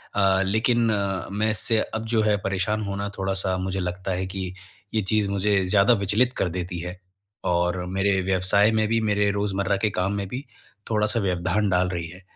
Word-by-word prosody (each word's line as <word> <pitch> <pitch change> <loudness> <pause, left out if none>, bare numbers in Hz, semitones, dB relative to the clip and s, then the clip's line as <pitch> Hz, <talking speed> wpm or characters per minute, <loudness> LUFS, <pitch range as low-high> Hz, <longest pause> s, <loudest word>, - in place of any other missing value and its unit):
अ, 95 -1 +3
लेकिन 115 +3 +2
अ, 100 -2 -1
मैं 110 +2 +1
इससे 110 +2 +1
अब 110 0 -4
जो 110 - +4
है 105 -1 +3
परेशान 100 +3 0
होना 100 0 -3
थोड़ा-सा 95 -1 0
मुझे 95 +1 -2
लगता 90 +1 -3
है 90 +1 -1
कि, 95 -1 -5 0.4
ये 110 - +2
चीज़ 105 0 +1
मुझे 100 0 +1
ज़्यादा 105 +5 +4
विचलित 110 +5 +1
कर 90 - +1
देती 90 0 -4
है। 90 +2 -6 0.5
और 90 +1 +1
मेरे 95 +1 +1
व्यवसाय 95 +3 +3
में 110 -1 +2
भी, 115 +1 +2
मेरे 105 -1 +2
रोजमर्रा 100 -1 0
के 110 +2 +1
काम 95 +2 -1
में 100 -1 -3
भी 130 +7 -6 0.5
थोड़ा-सा 110 +2 +2
व्यवधान 95 +2 0
डाल 90 0 +2
रही 85 -2 -3
है। 90 +3 -12
100 Hz, 190 wpm, -24 LUFS, 95-105 Hz, 0.5 s, जो